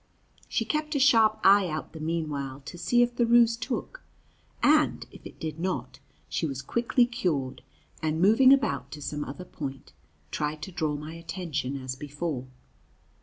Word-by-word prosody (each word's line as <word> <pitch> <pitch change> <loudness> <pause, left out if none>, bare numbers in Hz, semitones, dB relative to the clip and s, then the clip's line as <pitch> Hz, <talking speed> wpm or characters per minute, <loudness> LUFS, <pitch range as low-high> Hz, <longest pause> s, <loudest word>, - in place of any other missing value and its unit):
She - - 0
kept 305 0 -2
a - - +2
sharp 225 -5 +5
eye 195 0 +6
out 155 -1 -5
the 160 - -8
mean 160 +1 -1
while 140 -2 -5
to 140 +4 -9
see 180 +8 +3
if 240 0 -2
the 240 - +3
ruse 235 -1 +5
took, - - -5 0.6
and, 305 +1 +3
if - - -14
it - - -15
did 160 0 -5
not, 155 -10 -3 0.3
she 165 - -1
was 135 -1 -5
quickly 235 - +2
cured, 160 - -2 0.4
and, 160 0 -1
moving 225 +8 +6
about 140 - +2
to 150 - -7
some 150 +1 -3
other 145 +7 -8
point, 135 -5 -7 0.4
tried 150 0 -3
to 190 - -6
draw 155 -4 -1
my 150 +2 -7
attention 165 -5 -4
as 130 -1 -5
before. 145 -1 -4
165 Hz, 170 wpm, -27 LUFS, 145-230 Hz, 0.6 s, eye